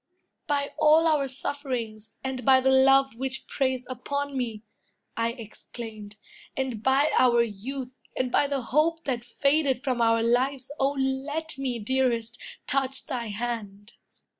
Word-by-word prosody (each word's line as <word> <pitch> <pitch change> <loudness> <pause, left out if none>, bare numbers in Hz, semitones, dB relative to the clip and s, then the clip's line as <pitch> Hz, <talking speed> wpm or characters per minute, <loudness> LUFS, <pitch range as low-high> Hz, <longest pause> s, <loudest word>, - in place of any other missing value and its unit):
"By 285 -2 0
all 310 +2 +6
our 300 -4 +3
sufferings, 255 -5 -4
and 265 -1 -3
by 260 +2 +6
the 265 +1 +3
love 270 -1 +5
Which 265 +1 -3
preys 260 -2 -1
upon 280 +3 -3
me," 230 -4 -3 0.5
I 230 0 0
exclaimed, 220 -2 -9 0.4
"and 260 -5 -2
by 270 +5 +3
Our 240 -2 +5
youth, 245 +5 -5 0.3
and 255 -1 0
by 290 - +3
the 280 -1 -1
hope 310 +7 +1
that 250 -5 -2
faded 275 +1 +1
from 255 -4 0
Our 230 0 +3
lives, 255 +3 +1
O 275 +1 +2
let 280 +4 -2
me, 255 -3 -1
dearest, 235 0 0 0.2
touch 270 -1 -1
thy 240 -3 -3
hand!" 210 -2 -5
260 Hz, 140 wpm, -26 LUFS, 235-275 Hz, 0.5 s, all